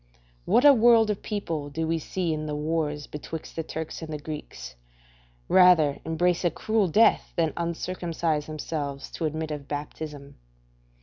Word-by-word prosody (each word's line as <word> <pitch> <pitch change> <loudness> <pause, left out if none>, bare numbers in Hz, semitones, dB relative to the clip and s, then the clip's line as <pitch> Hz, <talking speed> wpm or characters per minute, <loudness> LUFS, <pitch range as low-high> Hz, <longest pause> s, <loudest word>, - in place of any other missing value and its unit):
What 250 - +4
a 290 - +10
world 230 -2 +5
of 205 - -4
people 165 -9 -3
do 160 +3 -2
we 165 0 0
see 170 +1 -2
in 155 0 -4
the 150 - -3
wars 150 -1 -2
betwixt 155 +2 -8
the 165 - -1
Turks 160 +1 -6
and 160 -1 -7
the 155 - -3
Greeks, 145 - -8 0.7
rather 170 -6 +5
embrace 175 +2 +1
a 175 - +3
cruel 215 +2 0
death 215 +7 +3
than 165 -3 +1
uncircumcise 170 -2 -2
themselves 150 -2 -5
to 165 - -3
admit 155 0 -3
of 145 -2 -6
baptism? 145 0 -6
160 Hz, 160 wpm, -26 LUFS, 150-175 Hz, 0.7 s, a